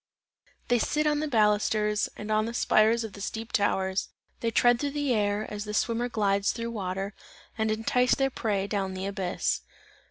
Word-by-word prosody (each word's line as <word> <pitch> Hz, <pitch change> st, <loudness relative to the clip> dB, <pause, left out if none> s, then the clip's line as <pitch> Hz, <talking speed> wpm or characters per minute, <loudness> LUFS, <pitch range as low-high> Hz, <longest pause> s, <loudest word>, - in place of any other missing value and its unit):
They 245 Hz, -1 st, +4 dB
sit 300 Hz, +6 st, 0 dB
on 300 Hz, -1 st, +2 dB
the 305 Hz, -, -1 dB
balusters 210 Hz, -3 st, +2 dB
and 210 Hz, +1 st, -5 dB
on 215 Hz, +1 st, +2 dB
the 235 Hz, -, -5 dB
spires 225 Hz, 0 st, +3 dB
of 220 Hz, -3 st, -7 dB
the 200 Hz, -, -10 dB
steep 225 Hz, +2 st, -5 dB
towers, 190 Hz, -2 st, 0 dB, 0.3 s
they 230 Hz, -, 0 dB
tread 240 Hz, +1 st, +4 dB
through 285 Hz, 0 st, -2 dB
the 285 Hz, -3 st, +1 dB
air 205 Hz, -1 st, 0 dB
as 210 Hz, -1 st, -5 dB
the 210 Hz, 0 st, -5 dB
swimmer 235 Hz, +2 st, 0 dB
glides 200 Hz, -3 st, +1 dB
through 230 Hz, -, -4 dB
the 235 Hz, -, -3 dB
water 195 Hz, -1 st, -3 dB, 0.4 s
and 220 Hz, -1 st, 0 dB
entice 225 Hz, +3 st, +2 dB
their 270 Hz, 0 st, +1 dB
prey 205 Hz, -5 st, -1 dB
down 195 Hz, -2 st, -2 dB
the 185 Hz, +1 st, -4 dB
abyss. 195 Hz, -2 st, -1 dB
215 Hz, 190 wpm, -28 LUFS, 205-235 Hz, 0.4 s, They